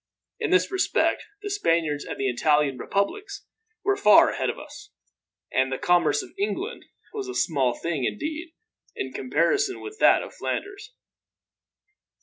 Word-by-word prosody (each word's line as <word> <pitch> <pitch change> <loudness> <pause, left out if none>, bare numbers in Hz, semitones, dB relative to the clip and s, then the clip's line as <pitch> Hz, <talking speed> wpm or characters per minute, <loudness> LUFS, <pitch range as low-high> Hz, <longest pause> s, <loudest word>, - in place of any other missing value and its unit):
In - - -1
this 390 +1 +3
respect 380 0 +1 0.2
the 410 - -3
Spaniards 165 - 0
and - - -6
the 135 - 0
Italian 145 +2 +2
Republics 395 - -2 0.4
were 400 0 +2
far - - +6
ahead - - -1
of - - -3
us, 420 - -11 0.6
and 130 +1 +2
the 130 - -1
commerce 175 - +2
of 375 - -12
England 405 - -3 0.3
was 410 -3 -4
a 380 - -6
small 135 -7 +1
thing, 160 -6 -2
indeed, 315 - -4 0.4
in 130 0 -4
comparison 270 - +1
with 425 +1 -9
that - - +5
of - - -10
Flanders. 400 +4 -5
300 Hz, 145 wpm, -25 LUFS, -, 0.6 s, far